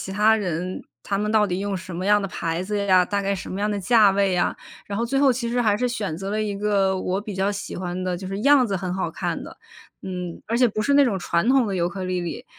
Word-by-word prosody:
其 190 - -6
他 215 +2 +4
人， 180 -2 -3 0.2
他 200 - -1
们 210 +1 -1
到 215 -1 +4
底 180 0 -2
用 200 -1 -2
什 185 -1 -8
么 180 +2 -4
样 210 0 +5
的 195 - -2
牌 165 -2 -3
子 205 +3 -3
呀？ 185 -2 +5
大 200 +1 -1
概 195 - 0
什 195 - -7
么 190 - -4
样 210 +1 0
的 205 - -1
价 210 +1 +5
位 195 0 +1
呀？ 180 - 0 0.3
然 200 0 -4
后 235 - 0
最 270 +3 0
后 275 -2 +5
其 235 -1 -3
实 245 +1 0
还 210 -2 +3
是 250 - 0
选 205 -9 -3
择 195 +3 -5
了 215 +1 0
一 205 -2 -3
个 200 -2 +1
我 185 +2 -1
比 210 -2 -7
较 195 +2 +1
喜 205 - -6
欢 180 0 -4
的 180 -1 -1
就 185 +2 -7
是 195 +2 -4
样 280 +1 +5
子 200 -3 -1
很 185 -1 -3
好 190 +1 -2
看 - - -3
的。 - - -10 0.5
嗯， 180 -2 -5
而 230 - -1
且 250 - +5
不 215 -1 -2
是 280 +6 +2
那 285 0 +6
种 225 -7 0
传 170 +4 0
统 265 -1 +4
的 195 - -2
尤 175 -1 +1
克 190 +1 -6
里 185 0 -1
里， 175 -1 -5
200 Hz, 310 characters per minute, -23 LUFS, 185-215 Hz, 0.5 s, 那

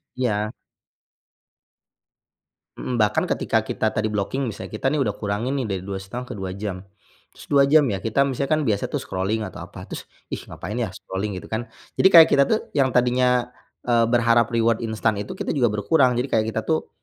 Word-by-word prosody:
Ya. 110 -4 -1 2.2
Mhm, 125 - -3
bahkan 105 -2 +2
ketika - - +1
kita 110 - -2
tadi 110 0 0
blocking, 110 +6 -2
misal 110 - -6
kita 110 +5 -1
nih 150 - 0
udah 105 - 0
kurangin 105 +5 -2
nih 125 - -2
dari 95 -3 -3
2,5 100 +5 -6
ke - - -5
2 95 -1 -4
jam. 100 -2 -4 0.5
Terus, - - -14
2 140 -1 +6
jam 150 0 +6
ya, 95 - -3
kita 115 +6 +1
misalnya 135 0 -2
kan 155 - 0
biasa 105 -6 0
tuh - - -1
scrolling 100 +4 -2
atau 95 - -8
apa, - - -9
terus, - - -7 0.3
“Ih, - - -3
ngapain 100 +4 -6
ya? 115 - 0
Scrolling? 95 +2 -5
"Gitu - - -8
kan. 110 +1 -3 0.3
Jadi, 190 - +6
kayak 165 -2 +10
kita 140 - +6
tuh 220 - +3 0.2
yang 135 -2 +4
tadinya, 125 0 +2 0.4
eee, 120 -1 +3
berharap 115 -1 +3
reward 115 -1 +2
instan 110 -2 -1
itu, 105 - -6
kita - - -2
juga 125 -5 +2
berkurang. 125 +4 +2
Jadi, 125 +3 -1
kayak 110 - +3
kita 110 - -1
tuh 160 -1 -1
115 Hz, 195 wpm, -23 LUFS, 105-125 Hz, 2.2 s, kayak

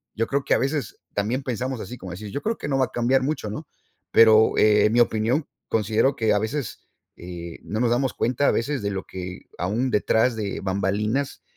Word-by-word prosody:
yo 115 - 0
creo 140 0 0
que - - +2
a - - +1
veces 135 -2 -2 0.2
también 110 +6 -1
pensamos 130 0 -3
así, 125 - -7
como 95 -4 -8
decir: 100 +3 -8
"Yo 140 - -4
creo 225 +1 -1
que - - -5
no 135 -1 +1
va 130 - +4
a - - -13
cambiar 125 +2 +2
mucho, 135 -6 -2
¿no?". 145 +8 -6 0.4
Pero 110 -1 +6
en 105 0 +5
mi 120 - +4
opinión 120 +6 +1 0.2
considero 110 +5 +2
que 110 -4 +2
a 105 - +2
veces 120 +4 -4 0.3
eh, 85 -1 -8
no 110 - -4
nos 120 -1 +2
damos 130 +2 +1
cuenta 125 +4 +1
a - - +5
veces 130 +1 -1
de 100 - -1
lo 95 -1 -3
que, 90 -1 -7
aún 110 +9 -1
detrás 110 +3 +2
de 105 -3 -3
bambalinas 105 +7 -1
115 Hz, 215 wpm, -24 LUFS, 105-130 Hz, 0.4 s, Pero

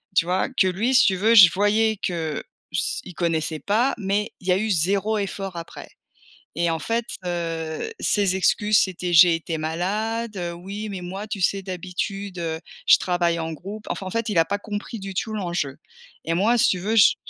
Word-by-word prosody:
tu 170 - +4
vois? 180 +7 0
Que 245 -7 +2
lui 215 +8 0
si - - +7
tu 190 - +2
veux 220 +5 +3
je 195 -6 +10
voyais 215 +2 +2
que 165 -5 -3 0.3
s - - -1
il 180 - -10
connaissait 160 -2 -1
pas, 225 - +1
mais 205 0 -1
il 185 - -13
y - - +4
a 180 - +4
eu 220 +3 -1
0 195 +5 +1
effort 195 -2 -4
après 165 - -9 0.6
et 170 +1 0
en 165 -1 -1
fait, 230 +8 -1 0.2
heu, 165 - -3
ses 200 -3 +2
excuses 210 +3 +3
c'était: 180 -2 -2
«J'ai 170 0 +7
été 165 0 -4
malade, 210 +8 -2
heu, 175 -2 -3
oui 200 +5 -6
mais 195 -2 -5
moi 190 +3 -6
tu 210 -2 -5
sais? 195 +2 +1
D'habitude, 185 +1 -5
heu, 160 -1 -3 0.3
je - - +8
travaille 175 -2 0
en 160 0 -3
groupe». 205 +7 -8
Enfin 195 - -4
en - - -4
fait 230 +3 -2
il 210 -5 -1
a 165 - +6
pas 200 +5 -2
compris 210 +2 -6
du 195 0 -6
tout 205 +4 -3
l'enjeu 170 -9 -3 0.5
et 165 - 0
moi 210 +8 +3
si - - +4
tu 185 - +1
veux 215 +5 -1
j 205 - +7
190 Hz, 210 wpm, -23 LUFS, 170-210 Hz, 0.6 s, je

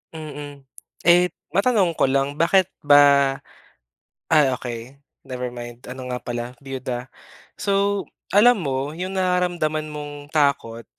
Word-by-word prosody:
Mm. 145 -2 -8 0.4
Eh 175 +1 +6 0.2
matanong 195 -2 +2
ko - - +4
lang, 140 +2 0
bakit 190 +2 +3
ba? 140 -2 +5 0.9
Ah 150 -4 +4
okey 120 +3 -7 0.2
never 125 -2 -4
mind, 120 0 -9
ano 125 0 -7
nga 125 0 -3
pala 120 0 -5
biyuda. 130 -2 -4 0.6
So, 200 0 +1 0.3
alam 240 +4 +6
mo 140 -1 -2
yung 185 +2 -4
nararamdaman 175 -4 0
mong 150 -1 -7 0.2
takot, 140 -6 0
145 Hz, 120 wpm, -22 LUFS, 130-175 Hz, 0.9 s, Eh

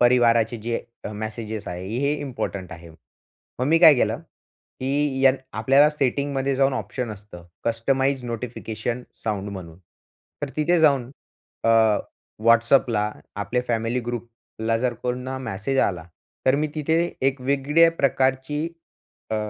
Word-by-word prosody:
परिवाराचे 120 -1 +4
जे 115 +2 -2 0.2
अ, - - -3
मेसेजेस 110 0 -5
आहे 90 +1 -5
हे 140 +2 +1
इम्पोर्टंट 100 - -4
आहे. 85 0 -11 0.7
मग 125 - 0
मी 165 +3 +4
काय 160 -3 +9
केलं, 125 - 0 0.6
की 140 0 0
यान 135 0 +6 0.2
आपल्याला 135 +7 +5
सेटिंगमध्ये 140 -1 0
जाऊन 135 0 +3
ऑप्शन 125 -2 -4
असतं 100 -4 -10 0.2
कस्टमाइज्ड 130 +3 +1
नोटिफिकेशन 115 0 -4 0.2
साउंड 105 -2 -2
म्हणून 90 -4 -9 0.6
तर 145 - -1
तिथे 165 +3 +3
जाऊन 140 -6 +3 0.5
अ, 115 - +4 0.7
WhatsAppला 115 -2 +4 0.3
आपले 125 +4 -1
फॅमिली 115 +1 0
ग्रुपला 115 -1 -4
जर 125 0 0
कोणा 125 +1 -3
मेसेज 130 +2 -2
आला 85 -4 0 0.4
तर 130 - +5
मी 155 +1 0
तिथे 155 +1 +1 0.3
एक 135 0 -5
वेगळ्या 140 +5 +3
प्रकारची 135 +3 +1 0.6
अ, - - 0
125 Hz, 130 wpm, -24 LUFS, 110-135 Hz, 0.7 s, काय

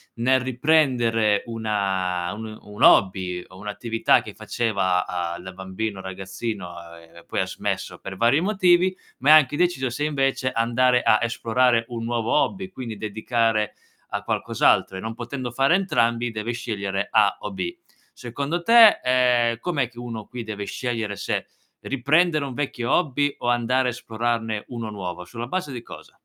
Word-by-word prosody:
nel 130 +2 +2
riprendere 125 -6 +2
una 95 -6 -1
un 110 +1 -7
uhm, 110 0 -9
un 105 - -3
hobby 95 -2 +4
o 95 - -15
un'attività 105 +3 +1
che - - -10
faceva, 95 -6 0
a 85 -1 -3
da 95 +1 -9
bambino, 95 +2 -5
ragazzino, 95 +1 -5
uhm, 85 -1 -12
e 85 - -14
poi - - -3
ha - - 0
smesso - - -4
per 95 0 -8
vari 120 +8 +3
motivi, 185 -1 +3 0.2
ma 140 +4 +2
è - - +10
anche 145 -2 +6
indeciso 150 -7 +1
se 135 +5 -3
invece 135 -3 0
andare 125 +2 +2
a 110 - +4
esplorare 115 0 +1
un 115 -2 -5
nuovo 115 -1 -1
hobby, 190 +5 0
quindi 125 - -7
dedicare 110 +1 0 0.4
a - - -3
qualcos'altro, 95 - +1
e - - -5
non 110 +2 -5
potendo 125 +1 -5
fare 135 +7 +2
entrambi 120 -11 +1
deve 110 +2 -3
scegliere 100 -4 -3
A 105 -2 +3
o 105 - -6
B. 95 -2 -4 0.4
Secondo 140 +8 -4
te, 230 +2 +7
ehm, 125 -2 +3
com'è 140 -8 -1
che 120 - -23
uno 115 -3 -6
qui 125 -1 -6
deve 105 -2 -5
scegliere 115 -3 -3
se - - -3 0.3
riprendere 150 +4 +2
un 135 - -6
vecchio 125 -3 -3
hobby 145 -3 +1
o - - -4
andare, 125 +2 +2
esplorarne 115 -2 -3
uno 115 -3 -5
nuovo? 90 -3 -6
Sulla 115 +7 -7
base 165 -1 -3
di 120 - -6
cosa? - - -13
115 Hz, 165 wpm, -23 LUFS, 105-130 Hz, 0.4 s, è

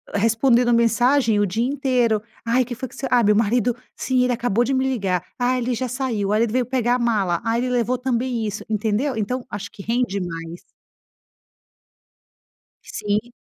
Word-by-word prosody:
respondendo 235 +3 +3
mensagem 235 0 +3
o - - +3
dia 220 +5 -1
inteiro. 255 -6 +1 0.2
"Ai, 240 +2 +3
que 245 0 -6
foi 255 +2 -5
que - - -16
você?"; 270 - -4
"Ai, 245 -1 +5
meu 210 0 +4
marido"; 230 +2 +2 0.2
"Sim, 255 -1 0
ele 250 - +1
acabou 240 -2 +1
de 270 - -1
me 260 0 +1
ligar"; 195 -8 -1
"Ai, 250 +1 +1
ele 245 +1 -1
já 255 +2 -3
saiu"; 240 -6 -2
"O - - 0
marido 215 +1 +1
veio 250 0 +1
pegar 245 -1 +1
a - - -1
mala"; 205 -8 +1
"Ai, 230 0 0
ele 250 +1 -1
levou 245 0 +1
também 245 -2 -1
isso". 210 0 -5
Entendeu? 220 +5 0
Então 245 +4 -2
acho 200 -3 -6
que - - -11
rende 230 -4 -1
mais. 165 -1 -6 2.2
Sim. 210 +3 -2
235 Hz, 185 wpm, -22 LUFS, 210-250 Hz, 2.2 s, Ai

